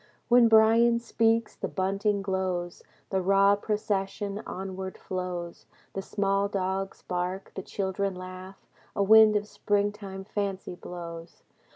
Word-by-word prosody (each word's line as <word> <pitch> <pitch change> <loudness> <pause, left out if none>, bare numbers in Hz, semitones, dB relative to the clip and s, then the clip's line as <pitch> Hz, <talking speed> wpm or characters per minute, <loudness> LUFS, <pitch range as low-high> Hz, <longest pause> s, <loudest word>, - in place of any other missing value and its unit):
When 240 -1 +7
Bryan 225 +1 +5
speaks, 230 -1 +1
the - - -4
bunting 200 +1 0
glows. 185 -2 -2 0.3
The 190 -1 +1
raw 195 +2 +4
procession 205 -1 -2
onward 190 0 -5
flows. 180 -2 -5 0.3
The 195 - -3
small 195 0 0
dogs 195 -1 -3
bark. 180 +2 -3
The 190 - -5
children 195 0 -2
laugh 185 +1 -10 0.3
A 200 - +2
wind 215 +1 +7
of 210 0 +1
springtime 205 -2 -2
fancy 195 -2 -3
blows. 170 -1 -9
195 Hz, 125 wpm, -28 LUFS, 185-210 Hz, 0.3 s, When